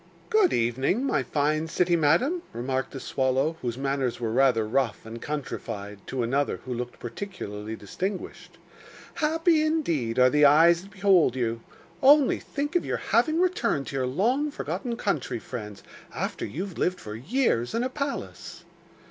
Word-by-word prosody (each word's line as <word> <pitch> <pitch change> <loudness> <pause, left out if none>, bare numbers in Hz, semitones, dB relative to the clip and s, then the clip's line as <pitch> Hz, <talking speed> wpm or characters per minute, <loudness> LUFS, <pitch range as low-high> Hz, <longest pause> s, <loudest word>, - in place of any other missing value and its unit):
'Good 430 -4 +4
evening, 130 - +1
my 275 - +1
fine 155 +2 0
city 175 +2 +2
madam,' 170 - +2
remarked 130 +3 -3
a - - -4
swallow, 135 +5 0
whose 120 -1 -3
manners 135 -3 -1
were 115 -2 -2
rather 120 -3 +3
rough 125 -1 -1
and 115 +1 -8
countryfied 105 -8 -5
to 130 -2 -2
another 140 +5 0
who 130 - -3
looked 125 0 -5
particularly 115 - -6
distinguished. 185 - -6 0.6
'Happy, 325 +1 +2
indeed, 170 - 0
are 125 0 +6
the 150 0 +3
eyes 165 +4 +6
that 195 - -13
behold 190 - +3
you! 115 -2 -1 0.4
Only 280 0 +6
think 290 +4 -4
of 350 - +3
your - - -2
having 315 0 +1
returned 255 - +1
to - - -6
your 130 -1 0
long 240 - +1
forgotten 245 -4 -4
country 145 - -1
friends, 105 -4 -8 0.3
after - - -3
you 175 - -4
have 190 -4 -9
lived 180 0 0
for 105 - -8
years 130 - 0
in 230 - +1
a 255 - -1
palace! 280 +1 -5
145 Hz, 160 wpm, -26 LUFS, -, 0.6 s, are